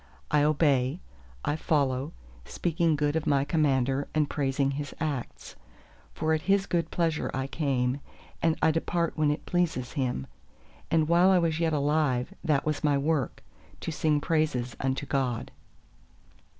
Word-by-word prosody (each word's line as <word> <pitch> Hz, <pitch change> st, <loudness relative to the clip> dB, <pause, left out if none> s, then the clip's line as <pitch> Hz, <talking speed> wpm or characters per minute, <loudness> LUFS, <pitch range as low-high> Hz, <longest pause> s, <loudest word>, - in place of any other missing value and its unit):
I 150 Hz, -, +4 dB
obey, 145 Hz, -1 st, +2 dB, 0.5 s
I 145 Hz, -, +1 dB
follow—speaking 145 Hz, -, -1 dB
good 145 Hz, 0 st, 0 dB
of 160 Hz, -, -1 dB
my 140 Hz, -1 st, +3 dB
Commander, 140 Hz, -3 st, +1 dB
and 150 Hz, -1 st, +3 dB
praising 135 Hz, -1 st, 0 dB
His 145 Hz, +1 st, -5 dB
acts. 145 Hz, -6 st, -4 dB, 0.6 s
For 160 Hz, 0 st, 0 dB
at 155 Hz, -, 0 dB
His 195 Hz, +2 st, +2 dB
good 170 Hz, -3 st, -1 dB
pleasure 165 Hz, -3 st, 0 dB
I 135 Hz, 0 st, -1 dB
came; 135 Hz, -3 st, 0 dB, 0.4 s
and 165 Hz, -1 st, +2 dB
I 160 Hz, -, +5 dB
depart 170 Hz, +1 st, -1 dB
when 155 Hz, -2 st, +2 dB
it 150 Hz, -, -2 dB
pleases 165 Hz, -8 st, 0 dB
Him; 125 Hz, -, -2 dB, 0.6 s
and 160 Hz, -2 st, +2 dB
while 175 Hz, +3 st, +5 dB
I 190 Hz, -, +5 dB
was 165 Hz, -2 st, +1 dB
yet 165 Hz, -1 st, +1 dB
alive 145 Hz, 0 st, +1 dB
that 150 Hz, -4 st, +1 dB
was 155 Hz, -1 st, -1 dB
my 145 Hz, -2 st, +3 dB
work, 145 Hz, -2 st, -1 dB, 0.4 s
to -, -, -3 dB
sing 150 Hz, -1 st, +1 dB
praises 145 Hz, -7 st, 0 dB
unto 135 Hz, +1 st, -1 dB
God! 130 Hz, -4 st, -1 dB
150 Hz, 150 wpm, -28 LUFS, 135-160 Hz, 0.6 s, I